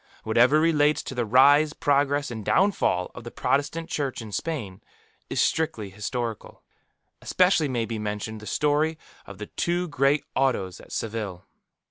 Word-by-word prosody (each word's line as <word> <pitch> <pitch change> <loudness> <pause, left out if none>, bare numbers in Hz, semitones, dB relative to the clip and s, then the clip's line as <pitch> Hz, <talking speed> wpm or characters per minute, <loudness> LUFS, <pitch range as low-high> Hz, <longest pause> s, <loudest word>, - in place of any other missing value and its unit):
Whatever 120 +7 +4
relates 155 -2 +2
to - - -6
the 120 -3 -2
rise, 145 +6 +5
progress, 145 -1 +1
and 110 -2 -6
downfall 185 - +1
of 125 - -10
the 120 - -7
Protestant 150 +7 -1
Church 145 -7 -3
in 110 -2 -8
Spain, 105 - -4 0.5
is - - -2
strictly 110 -11 0
historical. 110 +3 -5 0.6
Especially 180 -4 +3
may 120 -4 -1
be 115 -1 -4
mentioned 105 +1 -4
the 105 - -11
story 150 +2 +1 0.3
of 100 - -10
the 105 - -6
two 175 +9 -2
great 140 +1 +2
Autos 120 -9 0
at - - -15
Seville. 105 -5 -4
130 Hz, 150 wpm, -25 LUFS, 110-150 Hz, 0.6 s, rise